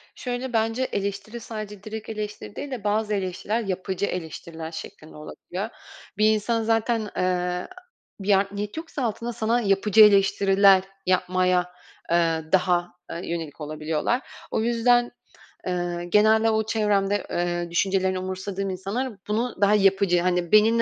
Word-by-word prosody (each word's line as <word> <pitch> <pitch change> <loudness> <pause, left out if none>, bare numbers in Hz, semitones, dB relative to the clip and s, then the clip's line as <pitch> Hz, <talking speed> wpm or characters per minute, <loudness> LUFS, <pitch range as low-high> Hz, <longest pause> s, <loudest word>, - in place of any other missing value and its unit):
Şöyle, 250 0 -4
bence 225 +3 +1
eleştiri 200 +1 -3
sadece 210 -3 -7
direkt 220 0 -7
eleştiri 210 - -6
değil 285 - -6
de 235 -5 -5
bazı 210 +1 0
eleştiriler 195 +4 -2
yapıcı 190 -1 -2
eleştiriler 165 -2 -6
şeklinde 160 -1 -9
olabiliyor. 185 +6 -6 0.5
Bir 215 +1 +5
insan 225 +2 0
zaten, 225 -1 +1
ııı, 180 0 0 0.5
bir 200 +1 +2
art 195 0 0
niyet 205 +5 -5
yoksa 320 -4 -5
altında 235 +1 -2
sana 235 +1 +1
yapıcı 205 +1 +4
eleştiriler 195 -1 +5 0.2
yapmaya, 185 -1 +1 0.4
ııı, 165 -2 +1
daha, 180 -2 +3 0.2
ııı, 170 - -5
yönelik 165 -3 -5
olabiliyorlar. 155 - -1 0.3
O - - 0
yüzden, 240 +1 +3 0.6
ııı, 175 -1 -2
genelde 215 +5 +4
o 220 0 +1
çevremde, 205 -2 +1
ııı, 175 0 -1
düşüncelerini 190 +1 +1
umursamadığım 190 +1 -4
insanlar 200 +8 -3
bunu 225 +3 -1
daha 200 +1 +5
yapıcı 195 -3 +3
hani 180 -1 0
beni, 215 0 +7
200 Hz, 135 wpm, -25 LUFS, 180-220 Hz, 0.6 s, beni